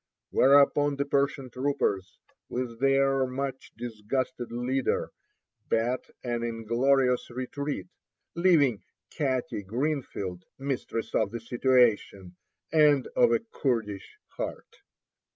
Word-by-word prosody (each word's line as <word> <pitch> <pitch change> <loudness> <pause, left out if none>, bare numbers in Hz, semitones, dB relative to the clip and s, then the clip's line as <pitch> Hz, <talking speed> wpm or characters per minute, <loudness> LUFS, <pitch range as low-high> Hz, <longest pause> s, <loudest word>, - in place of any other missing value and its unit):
Whereupon 145 +1 +5
the 140 0 -1
Persian 140 -2 0
troopers, 125 -8 -1 0.3
with 120 -2 -4
their 135 0 +3
much 135 +1 -4
disgusted 120 +2 -3
leader, 125 +3 -1 0.6
beat 120 +3 0
an 120 -2 -2
inglorious 120 +3 +1
retreat, 130 -2 -4 0.5
leaving 160 - +3 0.3
"Katty 130 -5 -1
Greenfield" 105 - -3
mistress 135 -4 -3
of - - +2
the 115 +2 -5
situation, 115 -6 +2 0.4
and 150 -4 +5
of 245 -2 +5
a 230 -1 +2
Kurdish 110 -7 -2
heart. - - -6
130 Hz, 100 wpm, -28 LUFS, 115-140 Hz, 0.6 s, Whereupon